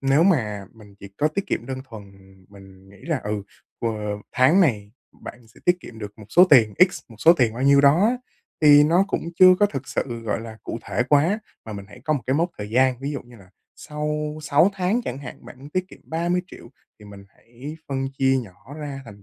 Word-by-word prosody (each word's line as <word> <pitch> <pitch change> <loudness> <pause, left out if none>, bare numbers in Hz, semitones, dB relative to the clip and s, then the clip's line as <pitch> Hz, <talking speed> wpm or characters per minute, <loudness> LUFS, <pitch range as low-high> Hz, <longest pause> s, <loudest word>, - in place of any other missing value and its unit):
nếu 135 +3 +3
mà 110 - +1
mình 105 -3 -17
chỉ 100 - -10
có 150 - +2
tiết 195 +6 -4
kiệm 120 - -3
đơn 130 0 -5
thuần, 110 -4 -9 0.5
mình 95 -1 -16
nghĩ 100 - -17
là 155 -6 -2
ừ, 105 -1 -3 0.4
q 105 -2 -3
tháng 140 +10 +4
này 105 - +1 0.3
bạn 120 -1 -10
sẽ 110 - -20
tiết 180 0 +3
kiệm 115 -8 -12
được 105 0 -9
một 105 - -11
số 175 +11 +6
tiền 115 -7 +6 0.2
X, - - -7
một 115 - -15
số 160 +9 +7
tiền 125 -9 +1
bao 125 - -4
nhiêu 140 0 +5
đó 145 +8 +5
á 245 +3 +1 0.4
thì 145 -1 +7
nó 170 +5 +3
cũng - - -3
chưa 185 -1 +8
có 205 - +6
thực 135 -8 -6
sự, 120 -3 -3
gọi 110 0 -2
là, 110 -1 -10
cụ - - -5
thể - - -1
quá, 155 +8 +3 0.3
mà 110 - -8
mình 100 -1 -8
hãy 100 - -14
có 155 - +1
một 135 -5 -2
cái 130 - +1
mốc 170 +4 +1
thời 105 0 -6
gian. 130 +1 +2
Ví 140 +2 -3
dụ 140 - -5
như 120 -1 -17
là 95 -3 -18 0.3
sau 150 0 -4
6 155 +5 +3
tháng 195 +5 0
chẳng 130 - -4
hạn, 140 - -10
bạn - - -13
muốn 140 +2 -12
tiết 185 +3 -2
kiệm - - -15
30.000.000 175 -2 -3 0.3
thì 105 - -15
mình 100 -1 -12
hãy 125 +9 -11
phân 135 -1 -2
chia 135 0 +3
nhỏ 115 +4 -10
ra 145 -3 -6
thành 100 -3 -13
135 Hz, 235 wpm, -23 LUFS, 110-155 Hz, 0.5 s, chưa